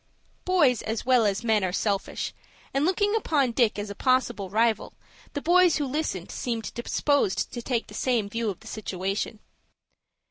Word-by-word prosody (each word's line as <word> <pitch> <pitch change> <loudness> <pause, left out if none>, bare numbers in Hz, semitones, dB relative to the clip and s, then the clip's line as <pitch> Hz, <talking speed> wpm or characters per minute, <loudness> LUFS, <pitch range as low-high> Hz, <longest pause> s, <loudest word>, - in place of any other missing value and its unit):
Boys 310 -10 +3
as 220 +1 -3
well 250 -4 +4
as 200 +2 -1
men 220 -3 +2
are 185 - 0
selfish, 200 +1 -2 0.4
and, 275 +2 +2
looking 410 +4 +2
upon 290 - +1
Dick 230 -3 +2
as 205 0 -4
a - - -4
possible 255 -5 +1
rival, 225 +2 +1 0.4
the 285 - -4
boys 355 0 +5
who 295 - -1
listened 265 - -3
seemed 230 -3 -3
disposed 240 -2 0
to 240 - -4
take 235 -1 -1
the - - -14
same 240 -5 0
view 230 +1 -2
of 190 - -6
the 220 - -13
situation. 200 0 -3
235 Hz, 170 wpm, -26 LUFS, 210-280 Hz, 0.4 s, boys